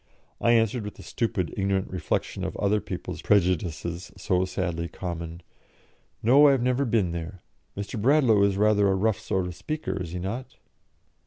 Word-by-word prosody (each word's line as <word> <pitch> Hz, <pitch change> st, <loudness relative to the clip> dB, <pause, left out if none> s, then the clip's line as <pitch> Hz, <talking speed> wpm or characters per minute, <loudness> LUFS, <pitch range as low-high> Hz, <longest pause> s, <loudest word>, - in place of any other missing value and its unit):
I 120 Hz, -, +4 dB
answered, 115 Hz, 0 st, +2 dB
with 105 Hz, -, -7 dB
the -, -, -12 dB
stupid, 105 Hz, -8 st, -2 dB
ignorant 95 Hz, -1 st, 0 dB
reflection 90 Hz, -, -2 dB
of -, -, -4 dB
other 105 Hz, +1 st, +1 dB
people's -, -, -6 dB
prejudices 85 Hz, -2 st, 0 dB
so 95 Hz, -1 st, +1 dB
sadly 85 Hz, -2 st, -2 dB
common, 85 Hz, -1 st, -6 dB, 0.8 s
"No, 135 Hz, +6 st, +7 dB
I 140 Hz, -, +6 dB
have 130 Hz, -3 st, 0 dB
never 125 Hz, +2 st, +1 dB
been 110 Hz, -7 st, +1 dB
there. 85 Hz, +2 st, -6 dB, 0.3 s
Mr. 100 Hz, +2 st, -4 dB
Bradlaugh 125 Hz, -4 st, +4 dB
is 100 Hz, -1 st, +3 dB
rather 105 Hz, -1 st, +4 dB
a 95 Hz, -, +2 dB
rough 105 Hz, +1 st, +1 dB
sort 95 Hz, -1 st, -1 dB
of 90 Hz, -, -5 dB
speaker, 95 Hz, -, -4 dB
is 85 Hz, -, -5 dB
he -, -, -3 dB
not?" 105 Hz, +9 st, -5 dB
100 Hz, 170 wpm, -26 LUFS, 90-115 Hz, 0.8 s, No